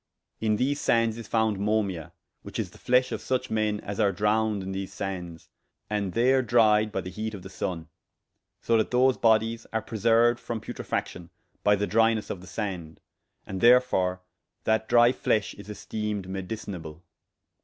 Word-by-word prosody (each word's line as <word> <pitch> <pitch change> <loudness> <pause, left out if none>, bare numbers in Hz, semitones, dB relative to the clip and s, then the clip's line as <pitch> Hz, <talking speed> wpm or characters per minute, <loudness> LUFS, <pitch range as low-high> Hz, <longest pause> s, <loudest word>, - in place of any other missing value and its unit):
In 110 -1 +1
these 140 +6 0
sandes 115 -1 +2
is 115 - -8
founde 110 -3 +1
Momia, 100 -5 -1 0.3
which - - -8
is - - -3
the - - -17
fleshe 125 +1 +2
of - - -3
such 130 0 -2
men 110 -1 0
as 100 0 -6
are 100 - +3
drowned 105 +1 +1
in 95 - -5
these 95 0 -4
sandes, 90 -4 -6 0.4
and 100 -3 -1
there 130 +3 +3
dryed 110 -2 +3
by 95 - -2
the 90 +1 -7
heate 110 +1 -4
of 95 - -10
the 95 - -10
sunne: 85 -3 -4 0.8
so 115 - +2
that 110 - +1
those 130 +1 +3
bodyes 115 0 +2
are 110 -1 -1
preserued 115 +2 +3
from 115 -1 -4
putrifaction 90 -4 -5 0.3
by 105 0 +5
the 100 0 -1
drynesse 115 0 +2
of 90 - -6
the 90 - -13
sand; 90 -8 -5 0.5
and 95 -1 -5
therefore 115 -7 +4 0.4
that 110 0 +1
drye 120 0 +6
fleshe 105 -4 0
is 100 +1 -12
esteemed 105 -1 -4
medicinable. 95 -4 -6
105 Hz, 170 wpm, -27 LUFS, 95-115 Hz, 0.8 s, drye